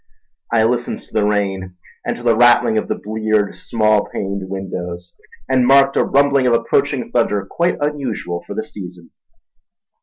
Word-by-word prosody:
I 115 -1 +3
listened 120 +1 -1
to - - -23
the 110 - +2
rain, 95 -3 -1 0.3
and - - -3
to 120 - -11
the 115 -2 +3
rattling 120 -2 +4
of - - -5
the - - -1
bleared, 110 -1 -1
small 110 -2 +1
paned 100 -1 -4
windows, 90 -2 -6 0.3
and 130 -2 +2
marked 135 0 +5
a - - +3
rumbling 140 -2 +3
of 120 - +3
approaching 130 +3 0
thunder 105 -5 +1
quite 170 - -1
unusual 130 -12 -3
for 100 - -6
the 110 - -2
season. 90 -5 -10
110 Hz, 160 wpm, -18 LUFS, 100-125 Hz, 0.3 s, marked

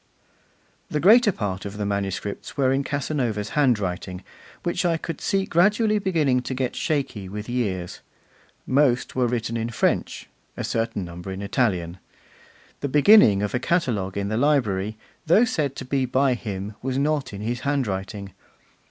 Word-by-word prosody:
The 150 - -1
greater 215 +6 +6
part 100 - -4
of 100 0 -7
the 105 - -2
manuscripts 100 0 -3
were 135 -2 +3
in 135 +1 +1
Casanova's 125 -8 -2
handwriting, 100 -9 0 0.4
which 175 - -1
I 170 -2 +2
could 165 -1 -6
see 195 -1 +1
gradually 210 +5 +3
beginning 155 -10 +1
to 130 - -4
get 130 -1 -2
shaky 135 -11 -2
with 105 +2 -6
years. 100 -8 -2 0.7
Most 130 -2 +2
were 125 -2 +2
written 115 -1 -2
in 115 +1 -2
French, 115 - -1 0.3
a - - -3
certain 115 -4 -2
number 85 +2 -8
in 95 +1 -5
Italian. 95 -6 -1 0.8
The 140 - -3
beginning 145 - +6
of 105 - -2
a 120 - +1
catalogue 115 - 0
in 100 0 -1
the 110 - -1
library, 110 -7 +1 0.3
though 205 +9 +6
said 145 - -1
to 135 - -6
be 130 0 0
by 130 +1 +2
him, 105 -3 -5
was 130 +1 -2
not 145 -1 0
in 100 -1 -7
his 120 +3 -2
handwriting. 100 -8 -3
125 Hz, 160 wpm, -24 LUFS, 100-145 Hz, 0.8 s, greater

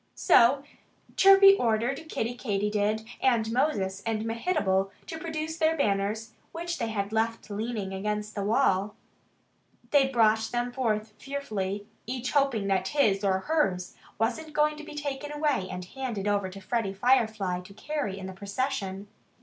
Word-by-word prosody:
So 270 -4 +5 0.5
Chirpy 390 0 +8
ordered 245 +7 0
Kiddie 235 -4 -2
Katydid 210 -1 -1 0.2
and 230 -4 +2
Moses 200 -7 0
and 220 -1 -2
Mehitable 225 - 0 0.2
to 320 - -6
produce 320 0 -4
their 320 0 +2
banners, 210 -1 0 0.2
which 345 +1 -4
they 230 - -1
had 205 -1 -3
left 225 0 -1
leaning 210 -2 -3
against 210 +2 -3
the 200 - -3
wall. 205 -2 +2 1.0
They 280 -2 +5
brought 220 -3 +3
them 245 0 -1
forth 220 -4 -1
fearfully, 210 -8 -4 0.2
each 250 0 -3
hoping 275 -8 +2
that 190 -1 +1
his 210 -8 +2
or 190 -1 +2
hers 190 - 0 0.2
wasn't 250 +8 -2
going 300 0 +2
to 305 - -8
be 300 - -9
taken 290 0 -4
away 295 -11 0
and 180 0 -6
handed 230 -2 -4
over 200 -2 +1
to 190 +1 -10
Freddie 195 0 -2
Firefly 215 -5 +2
to 180 +2 -14
carry 285 -7 -3
in 190 - -7
the 190 - -6
procession. 200 -1 -3
225 Hz, 150 wpm, -28 LUFS, 200-275 Hz, 1.0 s, Chirpy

